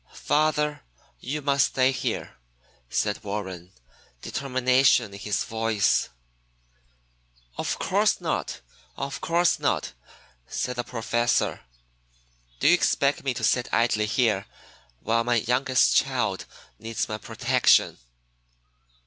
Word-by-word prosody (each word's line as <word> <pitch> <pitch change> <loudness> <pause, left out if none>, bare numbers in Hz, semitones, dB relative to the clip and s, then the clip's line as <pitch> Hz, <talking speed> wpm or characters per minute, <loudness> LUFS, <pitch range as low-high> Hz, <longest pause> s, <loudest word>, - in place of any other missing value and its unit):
"Father, 150 -1 0 0.4
you 145 +3 -4
must 140 0 +3
stay 130 0 +3
here," 130 - -4 0.5
said 105 +11 -1
Warren, 95 -4 -5 0.5
determination 130 -4 +2
in 100 - -9
his 105 -1 -1
voice. 110 -3 +1 1.5
"Of - - -2
course - - +1
not; - - -3 0.4
of 140 0 -5
course 170 +1 +2
not!" - - -1 0.5
said 125 -1 -3
the 120 - -1
Professor. 120 0 0 1.0
"Do - - +2
you 165 - +7
expect 145 -5 +1
me 135 -3 -1
to 120 - -5
sit 120 +3 +1
idly 110 -2 +2
here 110 -4 +1 0.5
while 115 +1 +1
my 120 +1 +1
youngest 125 +3 +2
child - - 0 0.3
needs 115 +1 -3
my 110 0 -5
protection?" - - +2
120 Hz, 110 wpm, -25 LUFS, 110-135 Hz, 1.5 s, you